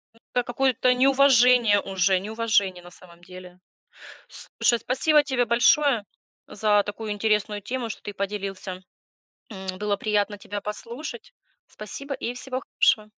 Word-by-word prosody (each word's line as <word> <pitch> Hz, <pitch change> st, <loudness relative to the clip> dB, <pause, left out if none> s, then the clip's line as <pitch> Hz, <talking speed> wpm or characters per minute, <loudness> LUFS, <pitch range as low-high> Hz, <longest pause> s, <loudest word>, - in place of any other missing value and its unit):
М, -, -, -23 dB
это 245 Hz, -, +1 dB
какое-то 255 Hz, 0 st, +1 dB
неуважение 250 Hz, -4 st, +5 dB
уже, 190 Hz, -1 st, +1 dB
неуважение 205 Hz, -4 st, 0 dB
на 175 Hz, -, -13 dB
самом 175 Hz, -2 st, -16 dB
деле. 180 Hz, 0 st, -12 dB, 0.7 s
Слушай, 235 Hz, -1 st, 0 dB
спасибо 295 Hz, +4 st, +2 dB
тебе 260 Hz, -4 st, 0 dB
большое 240 Hz, 0 st, +3 dB, 0.4 s
за 210 Hz, -1 st, +2 dB
такую 210 Hz, +1 st, -5 dB
интересную 210 Hz, -1 st, 0 dB
тему, 245 Hz, +1 st, -4 dB
что -, -, -8 dB
ты 205 Hz, -, -6 dB
поделился, 195 Hz, -2 st, -5 dB, 0.7 s
м. 190 Hz, -2 st, -6 dB
Было 210 Hz, -1 st, -1 dB
приятно 205 Hz, 0 st, -1 dB
тебя 205 Hz, 0 st, -6 dB
послушать. 235 Hz, +7 st, -7 dB, 0.3 s
Спасибо 275 Hz, +7 st, -8 dB
и 240 Hz, -, -4 dB
всего 255 Hz, +1 st, -5 dB
хорошего. 215 Hz, -1 st, +1 dB
215 Hz, 130 wpm, -24 LUFS, 200-250 Hz, 0.7 s, неуважение